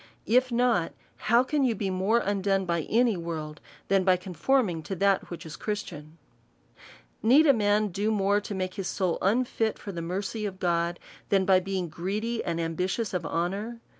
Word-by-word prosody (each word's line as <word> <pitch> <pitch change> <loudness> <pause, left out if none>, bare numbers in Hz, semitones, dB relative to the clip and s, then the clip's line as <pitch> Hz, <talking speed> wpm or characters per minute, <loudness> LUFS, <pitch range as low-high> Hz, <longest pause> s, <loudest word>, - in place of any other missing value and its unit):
If 255 +2 +3
not, 235 -8 +1 0.4
how 235 +2 +6
can 290 +2 0
you 240 -4 +2
be 195 -1 -2
more 190 +5 +2
undone 195 -1 0
by 170 -3 -1
any 235 -1 +3
world, 160 -3 -5 0.3
than 195 -1 +3
by 185 -1 +4
con 180 0 -9
forming 180 - +1
to 195 - -4
that 195 +1 +1
which 175 - -8
is 160 - -7
Christian? 165 -7 -6 1.0
Need 265 +8 +6
a 280 - +7
man 210 -2 +2
do 200 +4 -1
more 205 -1 +2
to 205 - -6
make 185 -1 -3
his 195 -3 -4
soul 185 -4 -1
unfit 225 +1 +1
for 200 - -7
the 170 -3 -5
mercy 195 +6 -3
of 190 -1 -8
God, 170 -1 0 0.3
than 195 -1 +3
by 190 -1 +5
being 190 -1 -3
greedy 205 +8 -3
and 170 -1 -2
ambitious 180 +7 -2
of 175 -4 -2
honour? 200 +8 -2
195 Hz, 185 wpm, -27 LUFS, 175-220 Hz, 1.0 s, a